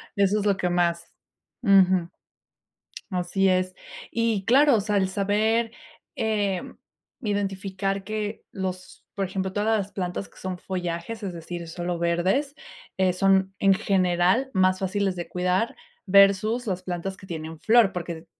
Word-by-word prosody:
Eso 200 +1 +2
es 205 - -3
lo 200 -2 +2
que 180 - 0
más 170 -1 0 0.5
Ujú. 185 -4 +4 1.0
Así 185 +1 +1
es, 185 0 +1 0.4
y 230 -4 0
claro, 275 +2 +5
o 215 - +2
sea, 210 0 0
el 190 - +2
saber, 215 +4 +1 0.4
eh, 205 -4 0 0.6
identificar 195 -2 -2
que 215 +1 -4
los 185 -1 -6
por 195 - -1
ejemplo, 190 0 -3
todas 215 +2 +1
las 200 0 -4
plantas 180 +1 -4
que - - -19
son 185 -1 -4
follajes, 180 +4 -4
es 195 -3 -4
decir, 170 0 -7
solo 175 +1 -4
verdes, 185 - 0 0.4
eh, 185 -1 +2
son 190 +1 +2
en 195 -1 +5
general 185 +6 +2
más 185 0 +3
fáciles 195 0 -1
de 175 -1 -5
cuidar 180 +5 0 0.3
versus 200 +5 +4
las 185 -4 -2
plantas 185 +1 -4
que 190 - -14
tienen 160 -1 -6
flor 225 -3 +4
porque, 170 -2 -5
190 Hz, 145 wpm, -25 LUFS, 180-205 Hz, 1.0 s, claro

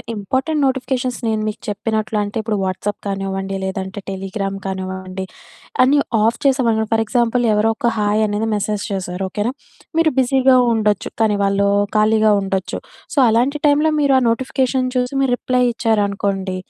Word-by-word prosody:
Important 260 +9 -1
notifications 255 -1 -2
నేను 220 -1 0
మీకు 215 - -5
చెప్పినట్లంటే 215 0 -2
ఇప్పుడు 215 -1 -2
వాట్సాప్ 190 +2 -3
కానివ్వండి, 195 0 -3
లేదంటే 190 +1 -4
టెలిగ్రామ్ 195 +1 -4
కానివ్వండి, 190 0 -5 0.6
అన్ని 280 +3 +4 0.2
ఆఫ్ 230 +2 +2
చేసామనుకో 235 -5 +2
ఫర్ 225 0 +3
ఎగ్జాంపుల్ 240 +1 +1
ఎవరో 210 +2 +2
ఒక 235 - +1
హాయ్ 210 +1 +1
అనేది 210 +2 -1
మెసేజ్ 210 0 -2
చేసారు 185 -1 -4
ఓకేనా! 210 +5 -1 0.5
మీరు 325 -2 +3
బిజీగా 260 0 +4 0.2
ఉండొచ్చు. 210 -3 0
కానీ 215 -2 +2
వాళ్ళు 200 0 +2 0.3
ఖాళీగా 215 0 +4
ఉండొచ్చు. 190 -1 -2 0.4
సో, 290 - -2
అలాంటి 245 +6 +2
టైంలో 300 +2 +3
మీరు 280 -2 +3
ఆ - - +2
నోటిఫికేషన్ 260 +1 0
చూసి 250 +1 0
మీరు 265 -2 +1
రిప్లై 250 0 0
ఇచ్చారనుకోండి. 200 -4 -1
215 Hz, 145 wpm, -19 LUFS, 195-250 Hz, 0.6 s, అన్ని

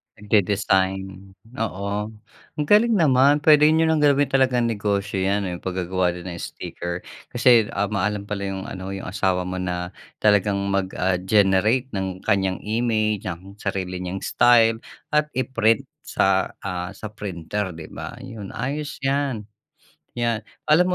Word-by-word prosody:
Nagde-design, 95 -2 0 0.2
oo. 100 -1 -2 0.5
Ang 150 - -1
galing 225 +2 +5
naman 145 -3 +4
pwede 150 -1 +7
niyo 160 +1 +4
ng 160 - +2
gawin 145 -1 +3
talagang 130 -2 +3
negosyo 105 -3 -1
'yan. 100 +2 +1
Yung 90 -2 -4
paggagawa 90 -1 -1
din 90 - -8
ng 85 - -7
sticker 85 +1 -6 0.3
kasi, 120 -3 +5
ah, 100 +1 0
maalam 105 0 -1
pala 100 -1 -4
yung 95 -1 -4
ano 95 -2 -6
yung 95 -1 -6
asawa 95 -2 0
mo 90 +1 -4
na 90 -1 -3 0.3
talagang 105 -1 +4 0.2
mag 95 -1 +1
ah, 90 0 +1
generate 105 +6 +2
ng 95 -2 -4
kanyang 95 -1 0
image 110 -2 0
ng 95 +3 -8
sarili 95 -2 -3
niyang 90 +1 -5
style 115 -2 +4 0.3
at 150 0 +2
i-print 120 -4 +2 0.2
sa, - - +1 0.2
ah, 90 0 -4
sa 105 +1 -8
printer, 95 -2 -4
'di 80 -1 -10
ba? 80 +7 -7
Yun 110 -6 -8
ayos 145 +5 -3
yan. 135 -5 0 0.7
'Yan. 120 -2 -1 0.2
Alam 180 +4 +5
100 Hz, 145 wpm, -23 LUFS, 95-120 Hz, 0.7 s, pwede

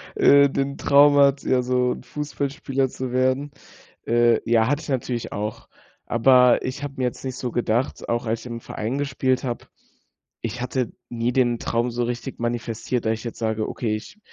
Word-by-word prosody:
äh, 140 0 +6
den 140 +1 -2
Traum 145 0 +5
hat, 140 0 +4
ja 130 -1 +2
so 125 0 +1
'n - - -10
Fußballspieler 140 -2 -2
zu 130 0 -5
werden. 130 +3 +1 0.6
Äh, 120 -1 +4
ja, 115 -1 +4
hatte 145 +3 0
ich - - -9
natürlich 125 -3 -2
auch. 105 +1 -5 0.4
Aber 125 +1 +5
ich 130 +2 -4
habe 140 -1 -5
mir 130 - 0
jetzt 125 - -4
nicht 130 -1 -4
so 125 - -3
gedacht, 120 +2 -1
auch 120 +1 0
als 115 0 -1
ich - - -13
im 115 -1 -6
Verein 115 +6 -4
gespielt 130 -2 0
habe 120 -2 -4 0.8
ich 115 +2 -4
hatte 125 -1 -2 0.2
nie 120 +1 -1
den 120 -2 +2
Traum 120 +1 0
so 120 +1 -1
richtig 120 +2 -5
manifestiert, 120 0 -2
dass 110 - +2
ich 110 +1 -6
jetzt 115 - -6
sage: 110 -1 -1
„Okay, 110 -3 -2
ich 110 - -9
125 Hz, 190 wpm, -23 LUFS, 115-135 Hz, 0.8 s, äh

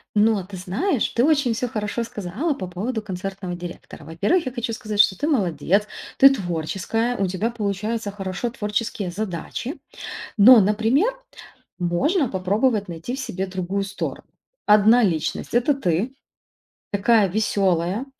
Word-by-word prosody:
Но 210 -2 +3
ты 190 +1 -9
знаешь, 210 - 0
ты 235 - +1
очень 285 -5 +3
всё 245 +3 -2
хорошо 215 +1 -3
сказала 225 - -3
по 190 -9 -6
поводу 215 +7 -3
концертного 190 -2 -5
директора. 175 -3 -9
Во-первых, 200 - 0
я - - -2
хочу 240 -2 -3
сказать, 215 -3 -5
что 200 -2 +6
ты 295 - -1
молодец, 200 - +1 0.3
ты 275 - +9
творческая, 200 - -2
у 195 - +1
тебя 195 +6 -1
получаются 210 0 -2
хорошо 195 +3 -4
творческие 210 -4 -3
задачи. 215 - -4 0.6
Но, 235 +4 +9
например, 225 - +2 0.7
можно 260 - +1
попробовать 205 +3 0
найти 170 +9 -5
в - - -7
себе 195 -7 -3
другую 190 +1 -2
сторону. 195 0 -5 0.4
Одна 215 +4 +6
личность- 165 -6 -1
это 245 +5 +3
ты, 210 - -1 0.8
такая 205 +1 +3
веселая, 195 +1 0
210 Hz, 140 wpm, -23 LUFS, 185-240 Hz, 0.8 s, ты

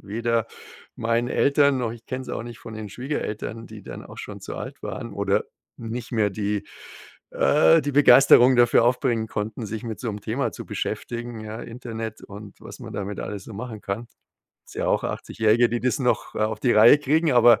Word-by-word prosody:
weder 115 +2 -1 0.5
meinen 115 +1 0
Eltern 140 -1 +3
noch 120 -3 -2
ich 120 -1 -13
kenn's 130 0 -5
auch - - -4
nicht 120 -1 -9
von 115 - -10
den 110 -1 -6
Schwiegereltern, 115 -2 -5
die 110 -2 -11
dann - - -9
auch - - -12
schon - - -8
zu - - -7
alt - - -7
waren 115 -3 -6
oder 100 -1 0 0.3
nicht 120 +2 -6
mehr 105 -3 +2
die 105 +1 -2 0.6
äh, 80 0 +4
die 145 - -2
Begeisterung 130 -2 +7
dafür 120 -1 +5
aufbringen 120 -2 +1
konnten, 110 +1 -4
sich 110 +3 -5
mit 110 -2 -5
so 120 - -3
'nem 105 -1 -5
Thema - - -1
zu - - -8
beschäftigen, 120 -1 -4
ja, 110 +2 -7
Internet 115 -2 -7
und 100 0 -11
was - - -11
man - - -9
damit 100 0 -4
alles 100 -2 -6
so 115 - -10
machen 110 -1 -7
kann. 105 +4 -4 0.6
Ist - - -14
ja - - -1
auch - - +1
Achtzigjährige, 110 +2 +1
die 120 0 -2
das 125 +2 0
noch, 125 -2 0
äh, - - -2
auf 110 0 0
die 125 - +3
Reihe 110 +6 +8
kriegen, 150 +1 +2
aber 120 -2 +6
115 Hz, 200 wpm, -24 LUFS, 110-125 Hz, 0.6 s, Reihe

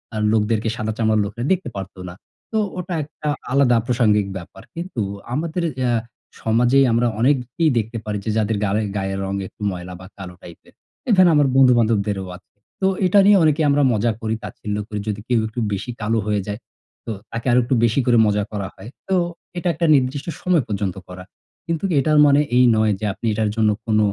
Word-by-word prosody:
আ - - -2 0.2
লোকদেরকে 110 +1 +1
সাদা 110 -2 -3
চামড়ার 110 -1 +2
লোকেরা 115 +4 -6
দেখতে 185 -9 -3
পারত 95 -1 -7
না।" - - -9 0.4
তো 220 - -1 0.2
ওটা 180 0 -4
একটা 155 +1 -9 0.2
আলাদা 130 -3 +4
প্রাসঙ্গিক 110 -5 +2
ব্যাপার। 95 +2 -11
কিন্তু 170 -8 -4 0.3
আমাদের 165 +5 -2 0.3
আ - - +2 0.5
সমাজেই 125 +4 +3
আমরা 120 +1 +2
অনেককেই 135 +5 +1
দেখতে 115 +1 -2
পারি 105 -1 -2
যে 110 - -2
যাদের 110 0 0
গালে 105 +2 0 0.2
গায়ের 95 0 -2 0.3
একটু - - -21
রঙ - - -1
ময়লা 90 0 -7
বা 95 - -11
কালো 95 -2 -8
টাইপের। 85 -2 -14 0.3
এ - - -3
ধরেন 185 -2 +6
আমার 145 -2 +4
বন্ধু-বান্ধবদেরও 110 -7 +3
আছে। 90 - -29 0.3
তো 190 - +3 0.2
এটা 190 +3 +5
নিয়ে 205 0 +7
অনেকে 155 0 +2
আমরা 145 +1 +3
মজা 115 +2 +1
করি, 110 0 -1
তাচ্ছিল্য 105 0 -5
করি 105 -2 -4
যদি 105 -1 -2
কেউ 120 -2 +2
একটু 110 +3 -6
বেশি 100 +5 -4
কালো 110 +2 0
হয়ে 105 -1 0
যায়। 105 +1 -4 0.5
তো 115 - -4 0.2
তাকে 115 0 -5
আরো 125 - +5
একটু 125 +2 0
বেশি 120 +3 +2
করে 120 -2 +4
মজা 105 0 +1
করা 100 -3 -4
হয়। 95 +4 -11 0.2
তো 190 - +2 0.4
এটা 175 +1 -2
একটা 170 +2 -1
নির্দিষ্ট 135 +2 -1
সময় 175 -6 +2
পর্যন্ত 100 -3 -2
করা। 90 0 -9 0.4
কিন্তু 165 0 -3 0.2
এটার 150 +2 +2
মনে 145 0 +5 0.2
এই 125 - +6
নয় 110 -1 +2
যে 110 - -3
আপনি 115 - -9
এটার 105 0 0
জন্য 110 -1 +3 0.2
কোন 110 -1 +2
115 Hz, 195 wpm, -21 LUFS, 105-140 Hz, 0.5 s, নিয়ে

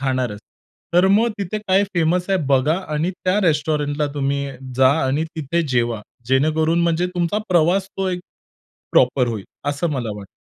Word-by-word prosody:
खाणारच. 130 -6 -1 0.6
तर 180 +2 +5
मग 220 +4 +4
तिथे 200 +2 -3
काय 195 -1 +2
फेमस 175 +2 +1
आहे 190 - +3
बघा 140 +4 +3 0.2
आणि 160 +5 0
त्या 185 +3 +2
रेस्टॉरंटला 150 -1 0
तुम्ही 140 0 -1 0.3
जा 130 0 +6
आणि 140 +5 0
तिथे 160 +3 -1
जेवा. 120 -3 0 0.3
जेणेकरून 155 +5 +2
म्हणजे 170 +1 +1
तुमचा 175 +4 0
प्रवास 180 +3 +3
तो 190 -1 -1
एक 180 -1 -2 0.7
प्रॉपर 125 0 +4
होईल 110 -4 -4 0.2
असं 150 +3 -1
मला 125 -6 -2
वाटतं. 100 -1 -9
155 Hz, 155 wpm, -21 LUFS, 130-180 Hz, 0.7 s, जा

